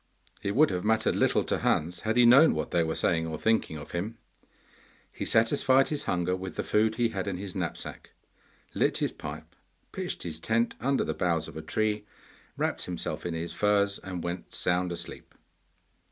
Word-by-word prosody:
It 100 - -2
would 155 +3 +5
have 90 -1 -2
mattered 110 +1 +2
little - - +3
to - - -1
Hans 85 +3 0
had 110 +4 -1
he 125 - +7
known 135 +7 +7
what - - -3
they 85 - +3
were 80 0 -2
saying 80 -1 +1
or 80 - -4
thinking 110 -8 +1
of 75 - -9
him. 105 +7 -3 0.9
He - - -5
satisfied 130 +3 +3
his 150 -2 -2
hunger 90 +1 0
with 95 -2 -6
the - - -2
food 110 +1 +2
he 115 0 +2
had 95 -2 -4
in 95 -2 -2
his 95 -1 -6
knapsack, 90 -3 -5 0.6
lit - - +1
his - - 0
pipe, - - -8 0.4
pitched - - -4
his 80 -2 -5
tent 115 +6 +1
under 135 +3 +1
the - - -2
boughs 85 -3 0
of - - -11
a 80 - -5
tree, 105 +2 -1 0.5
wrapped - - -1
himself 90 0 -4
in 85 - -3
his 85 +1 -4
furs, 100 -1 +2
and 90 -3 -6
went 85 +1 -5
sound 90 0 0
asleep. 85 - -7
95 Hz, 190 wpm, -28 LUFS, 85-110 Hz, 0.9 s, he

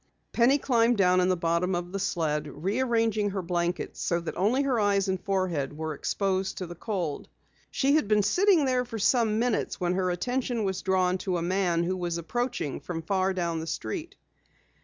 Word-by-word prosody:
Penny 245 +4 +4
climbed 240 -4 +2
down 185 -2 +4
in 180 - +2
the 185 - +2
bottom 170 +2 0
of 175 0 -4
the 195 - -3
sled, 160 -6 -1
rearranging 220 - 0
her 190 -1 -3
blankets 175 0 -2
so 170 - 0
that 170 - -5
only 230 +9 +2
her 260 -4 +1
eyes 200 -2 +2
and 190 -1 -1
forehead 175 -8 -1
were 160 0 -3
exposed 190 +4 -1
to 185 - -3
the 175 - -8
cold. 175 -5 -4 0.4
She 275 +1 +1
had 305 -8 +2
been 210 -1 +3
sitting 360 - +4
there 255 -1 +1
for 235 -2 -7
some 220 0 +2
minutes 235 -1 0
when 180 -1 0
her 185 0 0
attention 245 +5 -1
was 190 -2 -2
drawn 185 -1 +1
to 185 -2 -1
a 165 - -2
man 175 -2 +1
who 185 +2 -1
was 175 -2 -2
approaching 205 - -3
from 165 -2 -5
far 190 +2 +1
down 170 -3 -2
the 160 - -6
street. 110 -9 -4
190 Hz, 195 wpm, -27 LUFS, 175-225 Hz, 0.4 s, Penny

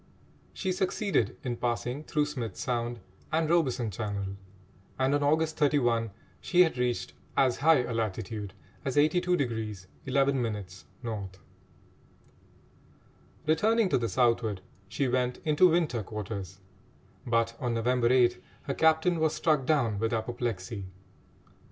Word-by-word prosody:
She 190 - -2
succeeded 185 - 0
in 120 -2 -3
passing 125 +4 -2
through 150 -1 0
Smith's 130 -7 -5
Sound 120 -3 -2 0.3
and 160 0 +1
Robeson 135 -9 +1
Channel, 100 -1 -4 0.6
and 130 +1 +2
on 145 - +2
August 155 +2 +1
31 120 -7 +2 0.3
she 180 0 +4
had 160 -7 -1
reached 125 -1 -1 0.2
as 130 -3 +3
high 155 -2 +4
a 125 - -4
latitude 105 -2 -3 0.3
as 130 - -2
82° 140 - +1 0.2
11' 135 -1 +2
N. 105 -4 -3 2.8
Returning 210 +7 +3
to - - +3
the 115 -1 -1
southward, 115 -2 +1 0.3
she 135 +6 0
went 125 0 0
into 155 +4 +5
winter 160 -8 +1
quarters; 100 -2 -6 0.7
but 115 0 +1
on 120 -2 -1
November 120 +1 +2
8 120 -1 +3 0.2
her 140 - -2
captain 160 +3 +3
was 155 -1 +1
struck 150 -5 +1
down 120 -10 +2
with 115 +1 0
apoplexy. 115 -3 -3
125 Hz, 125 wpm, -29 LUFS, 115-150 Hz, 2.8 s, into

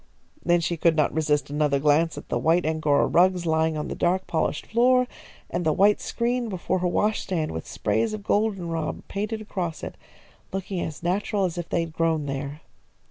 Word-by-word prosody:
Then 175 0 +3
she 170 +1 -1
could 165 0 +3
not 150 -2 +2
resist 150 -2 0
another 145 -1 +2
glance 155 +3 +2
at - - -8
the - - 0
white 165 +2 +2
Angora 155 -2 +2
rugs 180 0 +3
lying 160 -1 +1
on 150 - -3
the - - -4
dark, 180 +2 +1
polished 160 -2 -1
floor, 250 +2 +4 0.4
and 175 +1 -2
the 155 - +2
white 205 +5 +4
screen 240 0 -1
before 185 -1 -1
her 180 - 0
wash 210 +4 +1
stand 165 -5 -2
with 80 - -6
sprays 110 - 0
of 215 -1 -5
goldenrod 185 -7 -1
painted 215 +2 -3
across 180 -6 -4
it, - - -5 0.6
looking 190 -1 -3
as 160 -1 -5
natural 195 +2 0
as 175 -1 -3
if 175 - -5
they 170 - +1
had 165 -1 -5
grown 160 -2 +1
there. 140 +2 -4
170 Hz, 190 wpm, -25 LUFS, 155-195 Hz, 0.6 s, floor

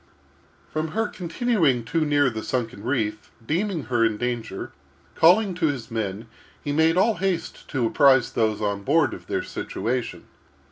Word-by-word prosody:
From 155 +1 -1
her 225 -1 +2
continuing 170 - 0
too 165 +8 0
near 145 -3 +3
the 110 -1 -5
sunken 115 -4 -3
reef, 110 -4 -2 0.2
deeming 170 - -1
her 120 -3 +1
in 115 -2 +1
danger, 120 -4 -4 0.4
calling 185 +4 +5
to 170 -2 0
his 130 -7 -4
men, 110 -1 -3 0.4
he 145 - -2
made 160 +3 +3
all 215 +4 +3
haste 185 -4 -2
to 130 -5 0
apprise 130 +1 +4
those 110 -2 0
on 100 -1 -1
board 145 +5 +2
of - - -10
their - - -1
situation. 125 0 -3
135 Hz, 155 wpm, -24 LUFS, 115-165 Hz, 0.4 s, calling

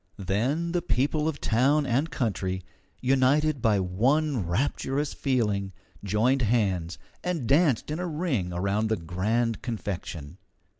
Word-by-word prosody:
Then 125 - -1
the 175 0 0
people 150 0 0
of 160 -3 -2
town 140 +6 +2
and 135 +6 +1
country, 95 - -2 0.4
united 135 +3 +2
by 105 -3 +3
one 120 - +1
rapturous 135 - -1
feeling, 105 -8 0 0.3
joined 115 +7 +2
hands, 95 -7 0 0.3
and 175 -7 -2
danced 145 -2 +3
in 155 - -2
a 180 - -2
ring 150 - -1
around 100 +5 0
the 110 - +1
grand 105 +7 -1
confection. 95 - -5
120 Hz, 130 wpm, -27 LUFS, 100-145 Hz, 0.4 s, by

